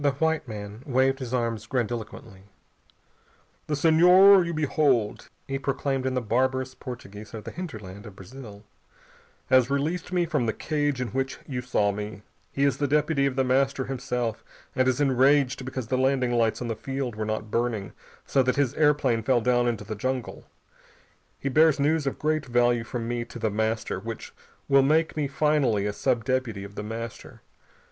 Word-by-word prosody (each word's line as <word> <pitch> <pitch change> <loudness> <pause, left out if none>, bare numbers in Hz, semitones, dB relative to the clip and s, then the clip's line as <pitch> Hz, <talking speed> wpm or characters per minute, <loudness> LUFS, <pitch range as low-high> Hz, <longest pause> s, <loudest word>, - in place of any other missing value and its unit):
The 140 -1 +3
white 160 +1 0
man 105 0 -7
waved 135 +1 +2
his 125 -3 -6
arms 115 -3 -2
grandiloquently. 115 -5 -4 1.2
"The 150 - 0
Senhor 180 +5 +7
you 170 - -3
behold," 145 -8 0 0.2
he 135 0 -2
proclaimed 135 -1 -1
in 130 - -1
the 125 - 0
barbarous 130 +3 0
Portugese 110 -4 -9
of 110 - -7
the - - -7
hinterland 105 - -8
of 100 - -12
Brazil, 105 0 -11 0.9
"has 130 -1 +5
released 155 +6 -1
me 180 -1 +1
from 150 -7 -1
the 110 - 0
cage 145 -3 -1
in 125 - -2
which 135 +3 -2
you 125 -3 -3
saw 105 -5 +1
me. 105 0 -6 0.3
He 140 - -1
is 140 - +2
the 145 - +1
deputy 145 -1 +2
of 135 - -3
The 135 - +2
Master 135 +1 +1
himself, 125 -3 -3 0.3
and 130 0 +2
is 130 +1 +1
enraged 135 -1 +3
because 130 -2 -4
the 130 - +1
landing 130 -2 +2
lights 115 0 +1
on - - -4
the 115 - -2
field 135 0 -4
were 110 - -3
not 110 0 -3
burning, 115 -5 -1 0.3
so 135 - +2
that 130 0 +1
his 140 -3 +1
airplane 145 -6 +2
fell 125 +2 +2
down 120 +1 +2
into 115 -3 -2
the 110 - -5
jungle. 130 +3 -4 0.9
He - - -4
bears 155 +2 +4
news 150 +1 +1
of 135 - -2
great 155 -1 -1
value 120 -1 +2
from 115 0 -5
me 120 0 -2
to - - -10
The 110 -2 -1
Master, 110 -2 -1
which 115 +2 -7 0.3
will 135 0 +5
make 155 +4 +2
me 150 -2 0
finally 140 -7 +1
a 105 - -1
sub 115 +2 0
deputy 130 -6 -1
of 100 0 -10
The - - -5
Master. 115 +2 -7
130 Hz, 185 wpm, -26 LUFS, 115-140 Hz, 1.2 s, Senhor